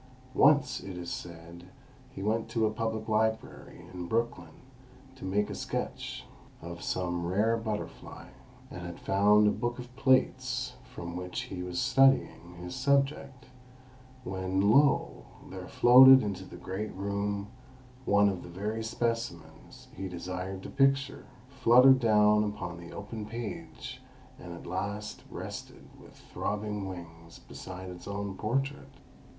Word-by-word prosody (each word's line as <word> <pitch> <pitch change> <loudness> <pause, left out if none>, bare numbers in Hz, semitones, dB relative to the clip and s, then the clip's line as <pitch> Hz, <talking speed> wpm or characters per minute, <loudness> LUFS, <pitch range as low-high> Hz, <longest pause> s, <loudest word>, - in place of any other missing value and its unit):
Once, 145 +1 +4
it 95 -2 -8
is 85 -1 -6
said, 85 +1 -8 0.4
he 95 - -8
went 110 +2 0
to 115 -1 +1
a 110 - +1
public 110 0 -3
library 110 0 -2
in 90 -1 -6
Brooklyn 110 -7 -2 0.5
to 130 - -13
make 100 +2 0
a - - -6
sketch - - -4 0.3
of 85 0 -8
some 90 -2 -2
rare 105 +6 +2
butterfly, 110 -2 -6 0.4
and - - -7
had 85 -1 -7
found 105 +2 +4
a - - +4
book 120 +2 -2
of 125 0 -10
plates 130 -1 +1 0.2
from 85 0 -7
which 90 0 -4
he 90 -2 -6
was 90 -1 -3
studying 135 -10 +3
his 90 0 -7
subject, 135 -1 0 0.8
when, 95 0 0
lo! 125 - +3 0.3
there - - -7
floated 130 +2 +8
into 95 -3 -4
the - - -11
great 95 +4 -5
room 100 +1 -2 0.5
one 100 -3 +4
of 95 -3 -1
the - - -10
very 105 +5 -3
specimens 110 -8 -4
he 95 +1 -4
desired 90 +2 -5
to - - -7
picture, 135 0 +1 0.2
fluttered 130 0 +6
down 105 -2 +4
upon 90 -5 -4
the 85 0 -10
open 105 +2 -6
page, 115 +1 -7 0.4
and 90 - -9
at - - -11
last 100 +4 -4
rested - - -8 0.2
with - - -16 0.2
throbbing 105 -1 -3
wings 85 -2 -10
beside 95 0 -9
its 90 -1 -10
own 100 -1 -4
portrait. 135 +7 -2
105 Hz, 140 wpm, -30 LUFS, 90-115 Hz, 0.8 s, floated